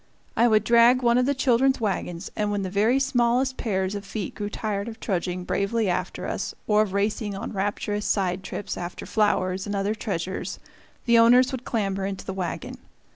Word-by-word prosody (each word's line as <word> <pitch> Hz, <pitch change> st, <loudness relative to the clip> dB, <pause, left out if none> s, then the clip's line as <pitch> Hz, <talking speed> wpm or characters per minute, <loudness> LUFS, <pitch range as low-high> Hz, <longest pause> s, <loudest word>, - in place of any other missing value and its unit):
I 235 Hz, -, +4 dB
would 215 Hz, -2 st, +4 dB
drag 235 Hz, +2 st, +5 dB
one 235 Hz, +1 st, +4 dB
of 250 Hz, -, +2 dB
the 285 Hz, -, +1 dB
children's 265 Hz, 0 st, +3 dB
wagons; 190 Hz, -4 st, -3 dB
and 210 Hz, -1 st, 0 dB
when 205 Hz, -1 st, -1 dB
the 185 Hz, -, -4 dB
very 220 Hz, +7 st, +3 dB
smallest 260 Hz, 0 st, +1 dB
pairs 190 Hz, -3 st, -1 dB
of 200 Hz, -1 st, -5 dB
feet 200 Hz, -1 st, -5 dB
grew 205 Hz, -1 st, -4 dB
tired 205 Hz, -1 st, -3 dB
of 225 Hz, -1 st, -8 dB
trudging 180 Hz, -2 st, -2 dB
bravely 200 Hz, +4 st, 0 dB
after -, -, -3 dB
us, -, -, -3 dB
or 210 Hz, 0 st, +4 dB
of 205 Hz, -3 st, -1 dB
racing 205 Hz, 0 st, -1 dB
on 195 Hz, -, -5 dB
rapturous 205 Hz, +1 st, -2 dB
side 185 Hz, -2 st, 0 dB
trips 195 Hz, -, -5 dB
after 175 Hz, 0 st, -6 dB
flowers 190 Hz, -3 st, 0 dB
and 205 Hz, -, -2 dB
other 200 Hz, +2 st, 0 dB
treasures, 190 Hz, -4 st, -4 dB, 0.5 s
the 235 Hz, -2 st, +5 dB
owners 245 Hz, +3 st, +6 dB
would 255 Hz, -2 st, -5 dB
clamber 195 Hz, -4 st, -1 dB
into 195 Hz, -1 st, -6 dB
the 190 Hz, -, -4 dB
wagon. 185 Hz, -2 st, -5 dB
210 Hz, 190 wpm, -25 LUFS, 195-235 Hz, 0.5 s, owners